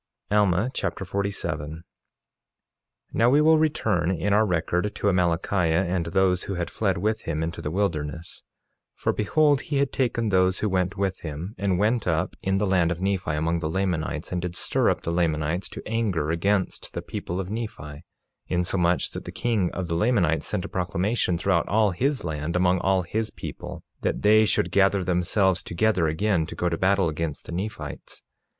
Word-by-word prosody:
Alma 105 +2 +3
Chapter 95 - -3
47 95 -7 -2
47:1 80 +2 -8 1.3
Now 115 +1 +4
we 140 +3 +5
will 160 +1 +5
return 110 - +1
in 95 +2 0
our 110 +1 +4
record 90 +3 0
to - - -1
Amalickiah 90 -1 +1
and 90 -1 -1
those 90 +1 +2
who 100 - -3
had 85 -1 -3
fled 95 -4 0
with 110 +4 0
him 80 0 -1
into 85 +2 -4
the - - -3
wilderness; 80 -3 -3 0.5
for, - - 0
behold, 145 +6 +3
he 145 - -2
had 140 -1 +1
taken 115 -4 0
those 95 -1 +3
who 105 - 0
went 95 +1 0
with 95 -1 -1
him, 80 +5 -6
and 95 -2 +1
went 110 +2 +1
up 80 -2 0
in 95 0 +1
the 105 - +1
land 90 -3 +2
of 85 - -3
Nephi 95 -2 -1
among 80 +2 0
the 80 -2 -2
Lamanites, 85 -3 -2
and 90 -1 -1
did 90 0 -4
stir - - +1
up - - 0
the 85 - -2
Lamanites 85 0 0
to - - -8
anger 100 -9 0
against 95 +3 -1
the - - -4
people 90 +2 -4
of 95 0 -4
Nephi, 80 -10 -6 0.4
insomuch 90 -1 +1
that - - -7
the - - -6
king 110 -7 0
of 95 -1 -4
the 85 - -2
Lamanites 85 -4 +2
sent 100 -3 -2
a - - -4
proclamation 90 +1 0
throughout 90 -1 +1
all 105 -1 +3
his 135 - -1
land, 80 +1 -3
among 90 0 +3
all 95 0 +2
his 110 +5 -2
people, - - -8 0.2
that - - -1
they 110 +1 +6
should 90 -3 +1
gather 100 0 +3
themselves 90 +1 +2
together 90 -1 +1
again 80 +1 +1
to - - -7
go 90 - 0
to 85 - -1
battle 95 -1 +3
against 80 -1 -4
the - - -8
Nephites. 95 +6 -6
95 Hz, 185 wpm, -25 LUFS, 85-105 Hz, 1.3 s, they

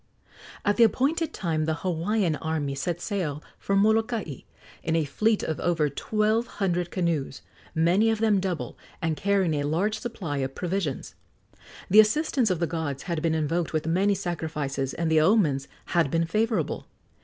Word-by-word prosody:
At 205 - +2
the 235 - +7
appointed 280 - +2
time 160 -4 -1
the 160 0 0
Hawaiian 180 0 +1
army 155 -3 -2
set 165 +5 -2
sail 165 -9 -3 0.2
for 195 - -1
Molokai 220 - +1 0.4
in 160 - -1
a 160 -2 +2
fleet 215 +10 +1
of 160 - -2
over 160 -4 +1
twelve 215 - 0
hundred 180 -3 -1
canoes, 165 -7 -2 0.3
many 175 +7 +3
of 225 - +1
them 215 -2 +3
double, 185 -4 -3 0.2
and 160 -1 -1
carrying 195 -2 +1
a 145 - 0
large 170 +9 0
supply 185 -11 -4
of 135 0 -3
provisions. 180 -6 -3 0.7
The 210 - +6
assistance 250 +1 +3
of 185 - +1
the 170 - 0
gods 160 -4 -3
had 170 -3 -2
been 165 -1 +1
invoked 160 +2 -1
with 155 -1 -1
many 190 +5 +2
sacrifices, 155 -7 -3
and 165 -1 -1
the 155 -1 +5
omens 155 -7 +3 0.2
had 170 -5 +1
been 165 +3 +1
favorable. 210 -1 -1
170 Hz, 165 wpm, -26 LUFS, 155-205 Hz, 0.7 s, the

